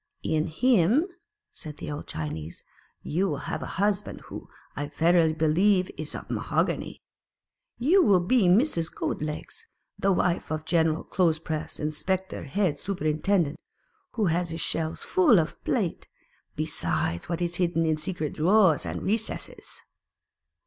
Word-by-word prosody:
'In 155 +1 0
him," 235 - +3 0.5
said 150 -2 -10
the - - -6
old 145 - -6
Chinese, 80 +1 -5 0.4
"you 185 +5 0
will 145 - -2
have - - -3
a - - -5
husband 205 +1 0
who, - - -10 0.3
I 145 0 -3
verily 165 +2 +3
believe, 180 +5 +2
is 155 0 -6
of - - -7
mahogany. - - -1 0.7
You 330 +11 +4
will 200 - +5
be 190 +3 +3
Mrs. 175 - +3
Goat - - -3
legs, 155 - -6 0.3
the 195 - +2
wife 175 -3 0
of 155 0 -1
a - - -27
General 160 -1 +1
clothes 170 -4 +1
press 155 -1 -5
inspector 180 +6 -2
head 160 +2 0
superintendent, 165 -2 0 0.5
who 220 -3 0
has 175 0 +1
his 165 +1 -4
shelves 160 0 -2
full 185 +4 +4
of 160 - -3
plate, 200 -9 -1 0.5
besides 85 - -2
what 170 -1 -1
is 175 0 -2
hidden 170 -2 +1
in 155 -1 +1
secret 155 -2 -3
drawers 185 -1 +4
and - - -4
recesses." 220 +2 -4
170 Hz, 145 wpm, -27 LUFS, 155-195 Hz, 0.7 s, will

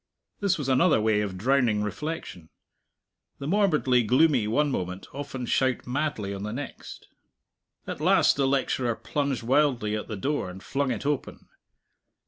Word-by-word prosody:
This 200 -2 +1
was 145 -4 -4
another 135 +3 +4
way 110 -1 +2
of 100 -3 -4
drowning 120 -1 +2
reflection. 105 - -5 0.9
The 140 - -7
morbidly 155 -9 +3
gloomy 130 0 +3
one 145 +6 +1
moment 90 -4 -4
often 140 -2 -5
shout 130 +1 +1
madly 125 -7 -2
on 100 - -6
the 105 +1 -4
next. 135 +4 -8 0.8
At - - -6
last - - +4
the 140 -1 +1
lecturer 130 -3 0
plunged 140 -2 -2
wildly 125 -4 +2
at 105 - -4
the 105 - -5
door 140 -2 -2
and 95 +2 -10
flung 140 -1 -1
it 120 +1 -3
open. 145 -2 -3
130 Hz, 150 wpm, -26 LUFS, 105-145 Hz, 0.9 s, another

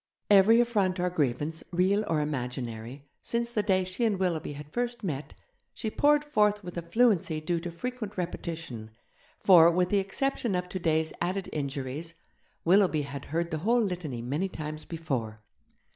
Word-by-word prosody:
Every 205 +4 +7
affront 205 -6 +1
or 180 0 0
grievance, 150 0 -1
real 190 +4 +2
or 155 -2 +1
imaginary, 125 -2 -4 0.2
since 235 0 -1
the 215 - +2
day 190 -3 +2
she 185 +5 -3
and 215 -4 +2
Willoughby 175 -5 -1
had 150 +1 -10
first 240 -1 -2
met, 150 -6 -4 0.4
she 220 -3 -3
poured 295 +3 +4
forth 210 -7 +2
with 175 -1 -8
a 170 - -2
fluency 170 -3 +2
due 170 +2 -1
to 175 +1 -5
frequent 215 +3 -5
repetition, 165 -10 -5 0.5
for, 170 -4 +7
with 180 +1 +1
the 205 - +3
exception 220 +2 -1
of 180 0 -1
today's 160 -3 0
added 185 +2 -1
injuries, 140 +3 -4 0.5
Willoughby 180 -4 +4
had 140 -1 -7
heard 170 +3 -2
the 155 - -2
whole 230 +7 +3
litany 170 - -3
many 150 +10 -1
times 155 -2 -6
before. 125 -10 -4
175 Hz, 160 wpm, -28 LUFS, 150-205 Hz, 0.5 s, Every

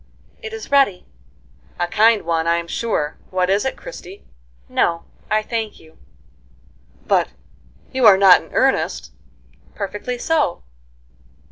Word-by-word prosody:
"It 445 -2 -7
is 445 -7 -8
ready." 270 -10 +3 0.7
"A 175 - +1
kind 220 +5 +3
one, 165 -1 -1
I'm 170 0 0
sure. 165 -8 -2
What 185 0 0
is 200 +4 +1
it, 265 - -2
Christie?" 205 - -11 0.4
"No, 170 -1 0 0.3
I 215 0 +1
thank 220 -1 -4
you." 160 0 -20 1.1
"But - - +2 0.7
you 260 -2 +4
are 195 - +8
not 190 -2 +7
in - - -18
earnest?" - - 0 0.6
"Perfectly 205 +4 -4
so." 300 - 0
200 Hz, 125 wpm, -20 LUFS, 170-240 Hz, 1.1 s, are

